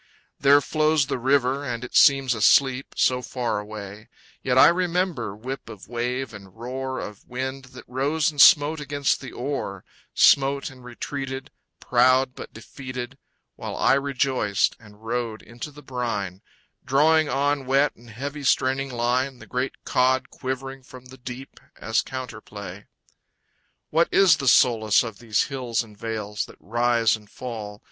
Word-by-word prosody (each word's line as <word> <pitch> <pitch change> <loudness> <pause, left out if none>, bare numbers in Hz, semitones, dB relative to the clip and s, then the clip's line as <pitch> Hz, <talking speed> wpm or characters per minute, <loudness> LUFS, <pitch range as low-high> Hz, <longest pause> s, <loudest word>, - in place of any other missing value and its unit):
There 140 +1 +6
flows 155 -1 +2
the 130 - -3
river, 135 +1 +2
and 120 -3 -4
it 125 - -8
seems 135 -3 +5
asleep 130 +4 +3
So 125 0 +2
far 120 -3 -2
away, 105 0 -9 0.3
Yet 130 -1 0
I - - +9
remember 175 - -1
whip 130 +5 -7
of 105 - -11
wave 125 +2 -3
and 100 -2 -12
roar 130 +2 -4
Of 105 -2 -8
wind 130 +1 -4
that 130 -1 -13
rose 145 +5 0
and 145 -2 +2
smote 150 +3 +6
against 145 -1 -1
the 130 - -8
oar, 120 -8 -4 0.3
Smote 140 0 +4
and 130 -2 -15
retreated, 135 +2 -6 0.3
Proud 130 +1 +3
but - - -9
defeated, 130 +2 -8 0.4
While - - -6
I - - +4
rejoiced 135 -6 +1
and 105 0 -17
rowed 115 -1 -3
into 120 +6 -8
the 150 0 -14
brine, 110 -8 -3 0.4
Drawing 155 +3 +3
on 140 0 0
wet 140 +2 +2
and 120 0 -17
heavy 140 +6 -6
straining 135 +1 +1
line 125 +2 0
The - - -13
great 125 +1 -4
cod 130 +1 +1
quivering 135 +1 -5
from 130 0 -14
the 130 +1 -13
deep 130 +2 -9 0.2
As 110 0 0
counterplay. 105 -7 -8 1.0
What 165 +2 +3
is 185 -5 +5
the 140 -4 -4
solace 110 -4 +4
of 115 -4 -7
these 110 -3 +1
hills 125 -4 -2
and 105 -2 -15
vales 105 -1 -4
That - - -15
rise 120 0 +2
and 105 -2 -14
fall? 110 -5 -7
130 Hz, 155 wpm, -24 LUFS, 115-135 Hz, 1.0 s, I